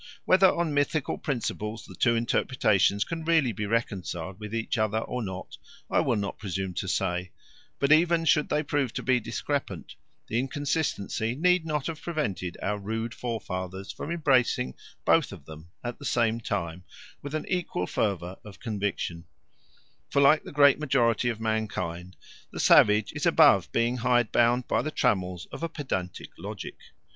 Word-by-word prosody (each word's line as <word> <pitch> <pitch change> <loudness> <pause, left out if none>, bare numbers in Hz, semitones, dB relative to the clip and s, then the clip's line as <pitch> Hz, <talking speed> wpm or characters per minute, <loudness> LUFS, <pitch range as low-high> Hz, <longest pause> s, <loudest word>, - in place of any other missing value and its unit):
Whether 190 0 +6
on 170 -3 -1
mythical 145 0 0
principles 115 -5 -3
the - - -12
two 115 +5 +2
interpretations 110 -4 +2
can 165 -1 -5
really 160 -6 +3
be 105 0 -4
reconciled 95 -5 -2
with 105 -1 -7
each 115 +1 -2
other 110 0 +1
or 125 +2 -3
not, 95 -3 -6 0.3
I - - +3
will - - +2
not 100 -1 -3
presume 95 -2 -3
to 95 - -3
say; 90 -1 -1 0.5
but 140 +1 +1
even 165 +1 +4
should 150 -2 +3
they 150 +1 +1
prove 140 -5 -1
to - - -4
be 130 -1 +3
discrepant, 110 - -4 0.3
the 115 - -1
inconsistency 135 -5 -1
need 180 +2 +2
not 150 -3 -1
have 160 -2 -4
prevented 140 - -3
our 105 +1 -1
rude 110 +3 -3
forefathers 95 -5 -5
from - - -7
embracing 130 - +2 0.3
both - - +3
of - - -11
them 80 +2 -11
at 120 0 -5
the 140 - -9
same 115 -3 +1
time 90 -5 -3 0.4
with 145 +2 -5
an 155 - -2
equal 175 - -1
fervour 95 -2 -2
of 105 -2 -12
conviction; 100 -6 -3 0.8
for 140 - +1
like 140 +2 +6
the - - -10
great 145 -1 +5
majority 120 -5 +2
of 115 -2 -3
mankind 100 -5 -3 0.4
the - - -7
savage 105 0 +5
is - - -1
above - - +5
being 120 +2 +1
hidebound 120 0 +2
by - - +1
the 155 - -3
trammels 90 - 0
of - - -8
a 165 - -2
pedantic 95 - -4
logic. - - -7
115 Hz, 165 wpm, -27 LUFS, 95-145 Hz, 0.8 s, Whether